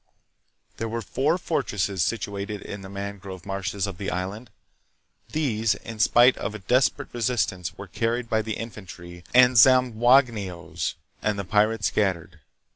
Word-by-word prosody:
There 115 Hz, 0 st, -3 dB
were 115 Hz, +1 st, -3 dB
four 150 Hz, +6 st, 0 dB
fortresses 105 Hz, -, -1 dB
situated 100 Hz, +1 st, -3 dB
in 100 Hz, -, -7 dB
the 95 Hz, -, -9 dB
mangrove 100 Hz, -2 st, -7 dB
marshes 100 Hz, 0 st, -2 dB
of 95 Hz, -3 st, -7 dB
the 100 Hz, -, -3 dB
island. 95 Hz, +7 st, -4 dB, 0.8 s
These, 115 Hz, -8 st, +1 dB
in 115 Hz, -1 st, -9 dB
spite 120 Hz, +3 st, +5 dB
of 110 Hz, -, -4 dB
a -, -, -3 dB
desperate 125 Hz, +7 st, +1 dB
resistance, 110 Hz, -7 st, -1 dB
were 100 Hz, -, -7 dB
carried 115 Hz, +6 st, -2 dB
by 110 Hz, -1 st, +1 dB
the 110 Hz, -1 st, -4 dB
infantry 90 Hz, -6 st, -9 dB
and 125 Hz, 0 st, +6 dB
Zamboangue 120 Hz, -2 st, +5 dB
nos, 85 Hz, -2 st, -5 dB, 0.3 s
and 105 Hz, -1 st, 0 dB
the 100 Hz, -, -4 dB
pirates 105 Hz, +1 st, +2 dB
scattered. 90 Hz, -5 st, -1 dB
105 Hz, 145 wpm, -25 LUFS, 95-120 Hz, 0.8 s, and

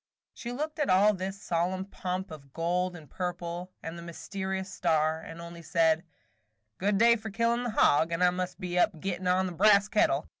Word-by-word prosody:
She 240 Hz, -, -6 dB
looked 305 Hz, +5 st, -4 dB
at 295 Hz, -, +1 dB
all 200 Hz, +3 st, +5 dB
this 190 Hz, +1 st, -5 dB
solemn 180 Hz, +3 st, -1 dB
pomp 185 Hz, -1 st, -4 dB
of 140 Hz, -3 st, -11 dB
gold 180 Hz, +2 st, -1 dB
and 160 Hz, -3 st, -11 dB
purple, 175 Hz, +1 st, -5 dB
and 165 Hz, +1 st, -6 dB
the -, -, -8 dB
mysterious 190 Hz, +3 st, -5 dB
star, 160 Hz, -1 st, +1 dB
and 165 Hz, +1 st, -10 dB
only 170 Hz, 0 st, -9 dB
said: 165 Hz, -1 st, +2 dB, 0.8 s
"Good 200 Hz, +2 st, +1 dB
day 235 Hz, +2 st, +6 dB
for 220 Hz, -1 st, -6 dB
killin' 230 Hz, +3 st, +1 dB
the -, -, -1 dB
hog, 165 Hz, -6 st, +3 dB
and 170 Hz, +2 st, 0 dB
I 180 Hz, -, +5 dB
must 180 Hz, +1 st, -4 dB
be 180 Hz, -2 st, -1 dB
up 175 Hz, -3 st, +2 dB
gettin' 185 Hz, +1 st, -3 dB
on 185 Hz, +1 st, +3 dB
the 185 Hz, -, -3 dB
brass 200 Hz, +3 st, +5 dB
kettle. 150 Hz, -8 st, +2 dB
180 Hz, 195 wpm, -29 LUFS, 170-200 Hz, 0.8 s, day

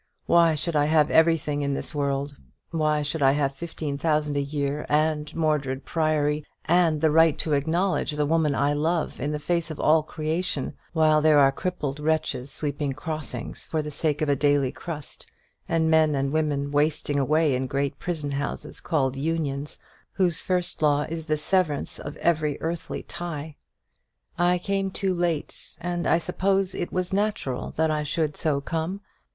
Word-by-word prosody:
Why 170 Hz, -2 st, +5 dB
should 165 Hz, +2 st, -2 dB
I 145 Hz, -1 st, +4 dB
have 155 Hz, -1 st, +3 dB
everything 160 Hz, -3 st, +3 dB
in 140 Hz, -1 st, 0 dB
this -, -, -4 dB
world? 140 Hz, -1 st, -1 dB, 0.4 s
Why 155 Hz, -2 st, +1 dB
should 150 Hz, +1 st, -2 dB
I 135 Hz, 0 st, +5 dB
have 140 Hz, -1 st, 0 dB
fifteen 150 Hz, -2 st, -5 dB
thousand 150 Hz, -2 st, +1 dB
a 140 Hz, -, +1 dB
year, 140 Hz, 0 st, -2 dB
and 150 Hz, 0 st, +1 dB
Mordred 150 Hz, -4 st, 0 dB
Priory, 155 Hz, -2 st, +1 dB, 0.2 s
and 165 Hz, -3 st, +3 dB
the 160 Hz, -1 st, +4 dB
right 160 Hz, 0 st, +5 dB
to 155 Hz, -, -1 dB
acknowledge 165 Hz, +4 st, +1 dB
the 150 Hz, 0 st, 0 dB
woman 155 Hz, -2 st, +2 dB
I 145 Hz, +1 st, +2 dB
love 160 Hz, +3 st, -1 dB
in 145 Hz, +3 st, -1 dB
the 150 Hz, -, -1 dB
face 170 Hz, +2 st, -1 dB
of 155 Hz, -, -7 dB
all 155 Hz, +1 st, +4 dB
creation, 155 Hz, -1 st, -2 dB, 0.2 s
while 155 Hz, -2 st, +4 dB
there 155 Hz, -1 st, +5 dB
are 135 Hz, -1 st, +6 dB
crippled 150 Hz, -3 st, -3 dB
wretches 150 Hz, -4 st, -1 dB
sweeping 145 Hz, -1 st, -2 dB
crossings 145 Hz, -4 st, -5 dB
for 155 Hz, -1 st, -1 dB
the 150 Hz, -, -5 dB
sake 150 Hz, 0 st, 0 dB
of -, -, 0 dB
a 140 Hz, -, +4 dB
daily 145 Hz, -2 st, +2 dB
crust, 155 Hz, -4 st, -7 dB, 0.4 s
and 165 Hz, -1 st, +2 dB
men 155 Hz, -2 st, +4 dB
and 135 Hz, 0 st, 0 dB
women 145 Hz, -3 st, 0 dB
wasting 145 Hz, 0 st, +1 dB
away 155 Hz, +2 st, +2 dB
in 130 Hz, +1 st, -1 dB
great 140 Hz, +1 st, -2 dB
prison 155 Hz, -5 st, -3 dB
houses 140 Hz, +1 st, -4 dB
called 135 Hz, -6 st, 0 dB
Unions, 145 Hz, -1 st, -2 dB, 0.4 s
whose 180 Hz, -4 st, +1 dB
first 180 Hz, -2 st, -1 dB
law 145 Hz, -1 st, +3 dB
is 160 Hz, 0 st, -5 dB
the 155 Hz, 0 st, +1 dB
severance 155 Hz, -2 st, 0 dB
of 145 Hz, -, -7 dB
every 155 Hz, -4 st, +1 dB
earthly 165 Hz, +1 st, -4 dB
tie? 160 Hz, -3 st, -6 dB, 0.8 s
I 175 Hz, +1 st, +3 dB
came 195 Hz, +1 st, -1 dB
too 190 Hz, 0 st, -1 dB
late, 170 Hz, -3 st, -3 dB
and 175 Hz, 0 st, -2 dB
I -, -, +4 dB
suppose 195 Hz, +2 st, 0 dB
it 175 Hz, -, -4 dB
was 185 Hz, 0 st, -2 dB
natural 200 Hz, -11 st, -1 dB
that 160 Hz, 0 st, +2 dB
I 155 Hz, 0 st, 0 dB
should 150 Hz, 0 st, -1 dB
so 155 Hz, -4 st, +1 dB
come. 165 Hz, +6 st, -3 dB
155 Hz, 175 wpm, -25 LUFS, 145-165 Hz, 0.8 s, are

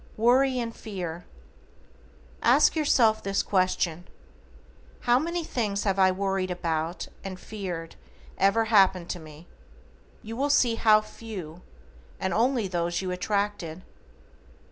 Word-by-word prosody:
=WORRY 255 Hz, +4 st, +3 dB
AND 230 Hz, -1 st, -4 dB
FEAR:= 175 Hz, -5 st, -6 dB, 1.2 s
Ask -, -, +4 dB
yourself 235 Hz, -8 st, +3 dB
this 195 Hz, 0 st, 0 dB
question: 180 Hz, -3 st, 0 dB, 0.9 s
"How 245 Hz, +1 st, +3 dB
many 340 Hz, +3 st, -2 dB
things 215 Hz, -9 st, -2 dB
I 195 Hz, -, +3 dB
have 185 Hz, -1 st, +3 dB
worried 195 Hz, -1 st, -1 dB
about 165 Hz, -1 st, -2 dB, 0.2 s
and 190 Hz, -1 st, -6 dB
feared 180 Hz, -7 st, -6 dB, 0.4 s
ever 200 Hz, +4 st, +3 dB
happened 190 Hz, -5 st, +3 dB
to 180 Hz, -, -5 dB
me?" 155 Hz, +1 st, -13 dB, 0.8 s
You 225 Hz, +1 st, -7 dB
will 280 Hz, +4 st, 0 dB
see 250 Hz, -4 st, +4 dB
how 215 Hz, -1 st, +5 dB
few, 200 Hz, -7 st, -9 dB, 0.6 s
and 190 Hz, -, -1 dB
only 235 Hz, -2 st, +1 dB
those 175 Hz, 0 st, -2 dB
you 185 Hz, -, -2 dB
attracted. 185 Hz, -2 st, -2 dB
195 Hz, 120 wpm, -27 LUFS, 180-225 Hz, 1.2 s, how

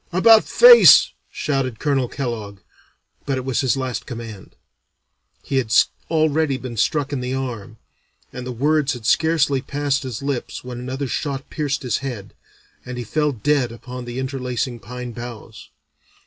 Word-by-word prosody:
'About 220 Hz, +5 st, +6 dB
face,' 485 Hz, 0 st, +8 dB, 0.2 s
shouted 135 Hz, -5 st, -2 dB
Colonel 135 Hz, -2 st, 0 dB
Kellogg, 115 Hz, -7 st, -5 dB, 0.7 s
but 135 Hz, -2 st, 0 dB
it 130 Hz, -, -5 dB
was 130 Hz, -2 st, 0 dB
his 130 Hz, 0 st, +1 dB
last 130 Hz, -2 st, -4 dB
command. 115 Hz, -4 st, -9 dB, 0.9 s
He 135 Hz, -, -2 dB
had 120 Hz, -4 st, -1 dB, 0.4 s
already 155 Hz, -3 st, +1 dB
been 130 Hz, -2 st, -7 dB
struck 145 Hz, +5 st, 0 dB
in 140 Hz, -, -1 dB
the 125 Hz, +1 st, -3 dB
arm, 120 Hz, -4 st, -5 dB, 0.6 s
and 125 Hz, 0 st, -7 dB
the -, -, -4 dB
words 145 Hz, +3 st, +1 dB
had 120 Hz, -3 st, -9 dB
scarcely 145 Hz, -1 st, +2 dB
passed 140 Hz, 0 st, -1 dB
his 130 Hz, -2 st, -6 dB
lips 140 Hz, -3 st, -4 dB
when 125 Hz, -1 st, -7 dB
another 130 Hz, +3 st, -4 dB
shot 135 Hz, +1 st, -4 dB
pierced 145 Hz, -2 st, -2 dB
his 125 Hz, -, -1 dB
head, 120 Hz, -8 st, -7 dB, 0.5 s
and 125 Hz, 0 st, -7 dB
he 120 Hz, -, -4 dB
fell 150 Hz, +6 st, 0 dB
dead 135 Hz, 0 st, 0 dB
upon 125 Hz, +2 st, -8 dB
the 120 Hz, +1 st, -7 dB
interlacing 130 Hz, -2 st, -3 dB
pine 125 Hz, +1 st, -7 dB
boughs. 120 Hz, -1 st, -10 dB
130 Hz, 155 wpm, -21 LUFS, 120-145 Hz, 0.9 s, face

